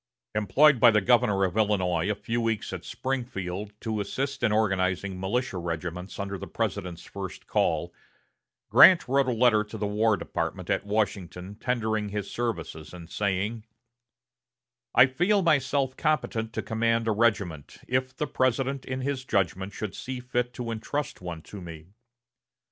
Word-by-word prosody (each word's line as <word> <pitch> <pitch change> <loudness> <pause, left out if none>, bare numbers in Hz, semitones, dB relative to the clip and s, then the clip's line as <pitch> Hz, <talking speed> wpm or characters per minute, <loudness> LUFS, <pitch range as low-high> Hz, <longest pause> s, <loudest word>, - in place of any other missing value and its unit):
Employed 125 +7 +4
by 120 - +8
the 110 -1 +4
governor 105 -2 +3
of 95 0 0
Illinois 95 -5 +1
a 105 - +1
few 115 +3 -2
weeks 115 -2 -1
at - - -5
Springfield 105 -7 -4
to 110 -2 -2
assist 135 +7 -3
in 120 -2 +2
organizing 95 -3 0
militia 100 +1 -1
regiments 85 +2 -5
under 100 -1 -4
the - - -7
President's 90 -1 -3
first 95 -2 -7
call, - - 0 0.8
Grant 180 -7 +8
wrote 135 +1 +2
a - - +2
letter 115 -2 +4
to 110 - -8
the 105 - -2
War 105 +1 +2
Department - - -3
at - - -1
Washington 95 -3 -2
tendering 110 -2 -1
his 100 -1 -4
services, 90 -9 -4
and 85 -1 -11
saying: 100 +2 -1 1.3
"I - - +9
feel 180 +10 +2
myself 135 -4 +2
competent 125 -7 0
to - - -3
command 115 0 0
a - - +3
regiment, 100 -9 0
if 130 +1 -1
the 150 - 0
President 130 0 0
in 130 0 -3
his 135 -1 -2
judgment 95 -4 0
should 105 -2 -5
see 130 -1 -5
fit 125 0 -1
to 120 -2 -4
intrust 120 +4 -4
one 85 -3 -6
to 100 - -10
me." 80 -1 -10
110 Hz, 155 wpm, -27 LUFS, 95-125 Hz, 1.3 s, I